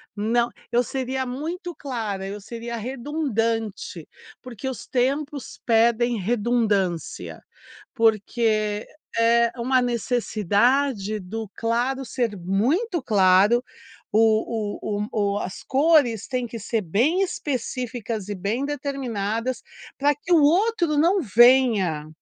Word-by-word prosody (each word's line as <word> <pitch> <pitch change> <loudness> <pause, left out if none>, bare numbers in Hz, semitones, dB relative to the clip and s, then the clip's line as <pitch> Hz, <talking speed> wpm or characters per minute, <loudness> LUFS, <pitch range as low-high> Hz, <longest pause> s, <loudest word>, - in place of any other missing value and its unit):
Não" 230 +3 +1 0.2
Eu 240 +1 +3
seria 260 +1 -3
muito 330 +8 -5
clara, 220 -8 -4
eu 200 +1 -6
seria 235 +3 -6
redundante, 230 - -3 0.4
porque 255 +1 -6
os 255 - -7
tempos 275 +2 -2
pedem 235 +1 +3
redundância. 205 -5 -1 0.5
Porque 215 -1 +1 0.3
é 235 0 +4
uma 255 +2 +2
necessidade 235 -1 +1
do 215 +3 -6
claro 245 +4 -1
ser 230 -4 -2
muito 265 - 0
claro. 205 +1 +4 0.5
O 220 -1 +1
o 210 - -2
o 205 -2 0
o - - -1
as 190 -1 -6
cores 275 -6 +3
têm 255 -2 -2
que 230 0 -7
ser 225 +1 -1
bem 250 - +2
específicas, 245 - -4
e 205 - -3
bem 210 +8 -2
determinadas, 255 -5 -3 0.4
pra 290 +1 +3
que 310 +5 -8
o 320 - +6
outro 350 0 +2
não 355 +5 +3
venha 220 - +4
235 Hz, 115 wpm, -24 LUFS, 210-265 Hz, 0.5 s, o